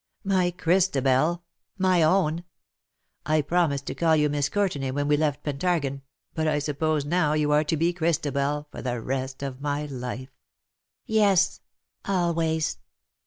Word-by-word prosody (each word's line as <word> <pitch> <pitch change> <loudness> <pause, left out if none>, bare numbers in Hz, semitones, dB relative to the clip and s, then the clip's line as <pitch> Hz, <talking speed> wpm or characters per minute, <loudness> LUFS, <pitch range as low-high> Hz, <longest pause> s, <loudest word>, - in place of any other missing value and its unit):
My 190 -3 +2
Christabel, 170 -3 +2 0.3
my 185 -2 +3
own! 165 0 +2 0.8
I 155 0 +1
promised 145 -4 +1
to - - -4
call 165 -2 +2
you 150 -1 +2
Miss 145 -1 0
Courtenay 175 -9 -1
when 145 +2 -1
we 150 - +4
left 150 -1 -1
Pentargon, 145 -2 -1 0.3
but 160 -1 -1
I 150 -1 +2
suppose 150 0 -1
now 155 -1 +1
you 150 -1 +1
are 150 +1 +4
to 160 - 0
be 170 +3 +1
Christabel 150 -3 -1
for - - -8
the 125 -2 -2
rest 130 +3 -4
of 135 -1 -5
my 145 +1 -2
life 130 -1 -6 0.3
!" - - -66
" - - -67
Yes, 200 -3 +3 0.4
always." 165 -4 0
150 Hz, 155 wpm, -26 LUFS, 140-175 Hz, 0.8 s, we